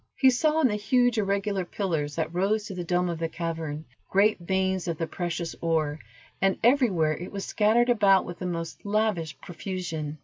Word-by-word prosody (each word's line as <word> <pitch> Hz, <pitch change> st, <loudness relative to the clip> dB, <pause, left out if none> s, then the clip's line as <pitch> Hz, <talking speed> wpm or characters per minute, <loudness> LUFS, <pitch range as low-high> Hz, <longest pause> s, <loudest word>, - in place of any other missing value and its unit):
He 265 Hz, -2 st, +5 dB
saw 310 Hz, +5 st, +2 dB
in 280 Hz, -, +5 dB
the 210 Hz, -, -1 dB
huge 245 Hz, +2 st, +2 dB
irregular 200 Hz, -1 st, 0 dB
pillars 165 Hz, -6 st, -2 dB
that 160 Hz, 0 st, -2 dB
rose 200 Hz, +4 st, +1 dB
to 200 Hz, -, -6 dB
the 180 Hz, -1 st, -4 dB
dome 180 Hz, +1 st, +1 dB
of 170 Hz, -2 st, -3 dB
the 165 Hz, -1 st, -1 dB
cavern, 160 Hz, -2 st, -4 dB, 0.2 s
great 205 Hz, +2 st, +3 dB
veins 190 Hz, 0 st, -1 dB
of 165 Hz, -2 st, -2 dB
the 165 Hz, -, -1 dB
precious 170 Hz, 0 st, -4 dB
ore, 155 Hz, -2 st, 0 dB, 0.4 s
and 195 Hz, 0 st, +2 dB
everywhere 220 Hz, -, +3 dB
it 175 Hz, -, -7 dB
was 200 Hz, -1 st, -5 dB
scattered 230 Hz, +3 st, +3 dB
about 200 Hz, -5 st, +4 dB
with 175 Hz, 0 st, -8 dB
the 185 Hz, -, -3 dB
most 165 Hz, -2 st, -5 dB
lavish 200 Hz, -6 st, -1 dB
profusion. 170 Hz, -4 st, -5 dB
185 Hz, 190 wpm, -27 LUFS, 165-210 Hz, 0.4 s, He